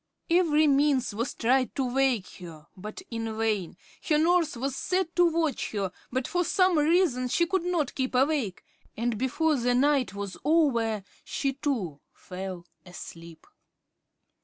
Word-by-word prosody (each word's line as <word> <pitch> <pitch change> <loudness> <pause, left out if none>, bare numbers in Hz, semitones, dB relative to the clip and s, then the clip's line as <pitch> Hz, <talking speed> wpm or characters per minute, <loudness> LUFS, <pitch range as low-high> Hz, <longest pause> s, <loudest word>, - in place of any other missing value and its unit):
Every 320 -3 +4
means 280 -4 +2
was 230 +5 -3
tried 255 +2 +1
to 270 - 0
wake 255 -5 +1
her, 165 -4 -11
but 210 +3 -8
in 225 -1 -4
vain. 210 -7 -1 0.3
Her 305 - +4
nurse 330 -3 +2
was 270 +2 -2
set 365 +3 -1
to 355 - +5
watch 320 -8 -1
her, 195 -3 -2 0.2
but 260 0 -1
for 355 0 0
some 365 -2 +3
reason 300 -5 +2
she 340 +7 +2
could 370 0 -1
not 345 -6 0
keep 260 -1 -2
awake, 260 - +1 0.3
and 235 +1 0
before 280 +6 +1
the 245 0 +1
night 265 -6 +2
was 200 -2 -5
over, 240 -9 +2 0.2
she, 275 -1 -2
too, 230 - -3
fell 185 -1 -7 0.2
asleep. 170 -2 -11
260 Hz, 150 wpm, -27 LUFS, 215-310 Hz, 0.3 s, to